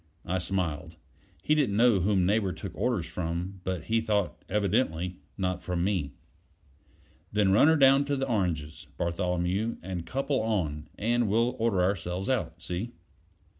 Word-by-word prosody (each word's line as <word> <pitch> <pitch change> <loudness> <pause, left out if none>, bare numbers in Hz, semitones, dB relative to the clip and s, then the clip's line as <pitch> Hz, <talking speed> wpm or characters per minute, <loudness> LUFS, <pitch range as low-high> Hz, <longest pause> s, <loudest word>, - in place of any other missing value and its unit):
I 90 +1 -1
smiled: 85 -4 -2 0.5
he 155 - +3
didn't 135 -10 +2
know 115 -3 +5
whom 95 0 +2
Neighbor 100 -1 +1
took 95 0 -7
orders 110 -5 0
from; 85 +3 -4
but 90 -3 -3
he 115 +5 +1
thought, 105 -4 -1
evidently, 95 -4 0 0.2
not 90 -1 -1
from 90 -1 -2
me. 90 -8 -1 1.2
"Then 105 -2 +3
run 110 +9 +6
her 160 - +6
down 135 -1 +5
to 145 0 0
the 135 0 -1
oranges, 85 - -2
Bartholomew, 90 +5 -1
and 90 -2 -4
couple 135 - -1
on, 85 -9 -1
and 120 +2 +1
we'll 115 +4 +2
order 110 -5 +2
ourselves 90 +1 -1
out. 90 -9 -1
See?" 95 +8 -4
95 Hz, 150 wpm, -28 LUFS, 90-115 Hz, 1.2 s, run